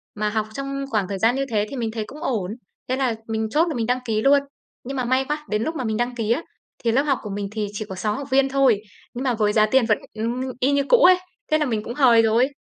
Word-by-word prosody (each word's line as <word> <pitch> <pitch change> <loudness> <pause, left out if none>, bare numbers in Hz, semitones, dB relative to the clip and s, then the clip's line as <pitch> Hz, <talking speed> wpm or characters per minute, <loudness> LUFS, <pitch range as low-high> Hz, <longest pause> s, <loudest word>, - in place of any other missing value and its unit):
Mà 210 0 -1
học 215 0 -1
trong 275 +1 -4
khoảng 210 -6 0
thời 195 -1 -4
gian 230 +5 +3
như 275 - -1
thế 210 -2 +1
thì - - -6
mình 230 -3 -2
thấy 220 -1 -3
cũng 300 +6 -11
ổn, 210 - -1 0.4
thế 255 - +1
là 260 -4 0
mình 220 0 -1
chốt 315 +9 +2
là 320 - -3
mình 230 -2 -1
đăng 250 +2 +1
ký 220 -2 0
luôn. 280 +2 +5 0.4
Nhưng 270 +2 -5
mà 255 - -1
may 260 +2 +1
quá, 300 +2 -3
đến 210 +1 0
lúc 320 +5 -3
mà 270 - -3
mình 220 -2 -1
đăng 240 +1 -1
ký 225 -2 -1
á, 255 +7 +2 0.4
thì 230 - +2
lớp 260 +4 +3
học 275 -3 +1
của 210 - -7
mình 200 0 -3
thì 210 -1 -2
chỉ 210 +1 -4
có 190 - -5
6 210 +3 -1
học 280 0 -6
viên 270 0 +4
thôi, 265 -6 +3 0.3
nhưng 245 - -4
mà 255 -2 +1
với 210 -2 +1
giá 215 -1 +5
tiền 245 +2 +3
vẫn, 215 -2 +2 0.2
ưm, 230 +3 -2 0.2
y 260 +3 +2
như 280 0 +2
cũ - - +7
ấy, 370 -6 +7 0.3
thế 310 - +5
là 305 - 0
mình 220 -5 -1
cũng 235 - -5
hời 245 -4 +5
rồi. 225 +3 +3
240 Hz, 295 wpm, -23 LUFS, 215-275 Hz, 0.4 s, cũ